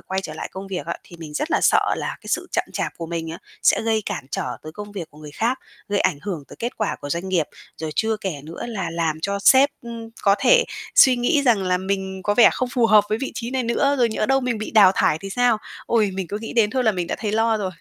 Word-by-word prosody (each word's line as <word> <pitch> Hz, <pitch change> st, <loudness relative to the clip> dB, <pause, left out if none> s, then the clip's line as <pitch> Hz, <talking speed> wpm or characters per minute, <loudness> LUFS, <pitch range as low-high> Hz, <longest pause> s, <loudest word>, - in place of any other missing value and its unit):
quay 190 Hz, 0 st, -3 dB
trở 190 Hz, -, -7 dB
lại -, -, -5 dB
công 190 Hz, +1 st, -7 dB
việc 185 Hz, -2 st, -4 dB
á, -, -, -3 dB
thì 175 Hz, -, -13 dB
mình 160 Hz, -3 st, -9 dB
rất 305 Hz, -, -2 dB
là -, -, +2 dB
sợ -, -, +4 dB
là -, -, -4 dB
cái -, -, -15 dB
sự -, -, -1 dB
chậm -, -, +1 dB
chạp -, -, -2 dB
của 165 Hz, -, -5 dB
mình 165 Hz, -1 st, -4 dB
á, 165 Hz, -, -7 dB, 0.2 s
sẽ -, -, +4 dB
gây 220 Hz, -1 st, +1 dB
cản -, -, -3 dB
trở -, -, -3 dB
tới 155 Hz, -, -9 dB
công 205 Hz, +3 st, -8 dB
việc 175 Hz, -6 st, -6 dB
của 150 Hz, -, -17 dB
người 150 Hz, -1 st, -10 dB
khác, 235 Hz, -, -1 dB, 0.3 s
gây 205 Hz, 0 st, +1 dB
ảnh 145 Hz, -, +1 dB
hưởng 175 Hz, -8 st, -4 dB
tới -, -, -12 dB
kết 235 Hz, +2 st, -4 dB
quả -, -, -1 dB
của 145 Hz, -, -6 dB
doanh 170 Hz, +5 st, -2 dB
nghiệp. 170 Hz, -5 st, +1 dB, 0.3 s
Rồi 160 Hz, -1 st, -4 dB
chưa 220 Hz, 0 st, +1 dB
kể 195 Hz, -3 st, -3 dB
nữa 165 Hz, +8 st, -7 dB
là 195 Hz, -8 st, -3 dB
làm 165 Hz, -2 st, -1 dB
cho 200 Hz, +2 st, -1 dB
sếp, 270 Hz, +7 st, +6 dB
ưm, 230 Hz, -1 st, -7 dB
có 200 Hz, -1 st, +5 dB
thể -, -, +5 dB, 0.3 s
suy 260 Hz, -2 st, +7 dB
nghĩ 280 Hz, +5 st, +2 dB
rằng 235 Hz, -7 st, +3 dB
là 185 Hz, -1 st, +1 dB
mình 190 Hz, 0 st, -3 dB
có 205 Hz, -, +1 dB
vẻ 235 Hz, -, +7 dB
không 255 Hz, -, -2 dB
phù 240 Hz, -1 st, +2 dB
hợp 215 Hz, -2 st, +6 dB
với 215 Hz, -, 0 dB
vị 270 Hz, -, -3 dB
trí 235 Hz, 0 st, -4 dB
này 260 Hz, -1 st, 0 dB
nữa, 260 Hz, +4 st, +1 dB
rồi 240 Hz, -2 st, +4 dB
nhỡ 215 Hz, -1 st, -1 dB
đâu 270 Hz, +2 st, +3 dB
mình 250 Hz, -3 st, -1 dB
bị 215 Hz, -, -5 dB
đào 200 Hz, -4 st, +7 dB
thải 155 Hz, -, +2 dB
thì 195 Hz, +4 st, -8 dB
sao? 245 Hz, 0 st, +2 dB, 0.3 s
Ôi, 220 Hz, -4 st, +2 dB
mình 190 Hz, -1 st, -3 dB
cứ 205 Hz, -, -3 dB
nghĩ 225 Hz, -, -7 dB
đến 220 Hz, -3 st, +3 dB
thôi 255 Hz, +1 st, 0 dB
là 220 Hz, -, +4 dB
mình 180 Hz, -3 st, -2 dB
đã -, -, -3 dB
thấy 210 Hz, -2 st, -2 dB
lo 225 Hz, 0 st, +2 dB
rồi. 205 Hz, -, -2 dB
210 Hz, 285 wpm, -22 LUFS, 185-235 Hz, 0.3 s, suy